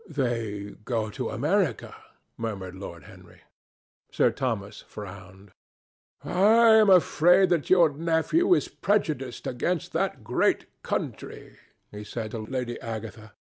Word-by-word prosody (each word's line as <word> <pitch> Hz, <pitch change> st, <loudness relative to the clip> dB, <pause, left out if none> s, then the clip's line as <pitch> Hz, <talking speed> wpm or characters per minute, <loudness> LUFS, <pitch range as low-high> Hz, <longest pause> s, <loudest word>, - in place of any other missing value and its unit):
"They 115 Hz, -8 st, -3 dB
go 110 Hz, -3 st, -2 dB
to 130 Hz, -, -4 dB
America," 165 Hz, -, -1 dB, 0.4 s
murmured 100 Hz, -5 st, -5 dB
Lord 85 Hz, -4 st, -9 dB
Henry. -, -, -16 dB, 0.7 s
Sir -, -, +3 dB
Thomas 110 Hz, -6 st, -4 dB
frowned. 95 Hz, -1 st, -11 dB, 0.7 s
"I 225 Hz, +5 st, +4 dB
am 215 Hz, -2 st, +5 dB
afraid 180 Hz, 0 st, +5 dB
that 170 Hz, -4 st, 0 dB
your 175 Hz, -4 st, +5 dB
nephew 165 Hz, -, +1 dB
is -, -, -1 dB
prejudiced 155 Hz, -11 st, -2 dB
against 165 Hz, +7 st, -2 dB
that -, -, -2 dB
great -, -, +1 dB, 0.2 s
country," -, -, -5 dB, 0.3 s
he 105 Hz, 0 st, -8 dB
said 110 Hz, 0 st, -6 dB
to 115 Hz, -, -5 dB
Lady 120 Hz, +2 st, -4 dB
Agatha. 110 Hz, -2 st, -7 dB
125 Hz, 120 wpm, -26 LUFS, 105-170 Hz, 0.7 s, am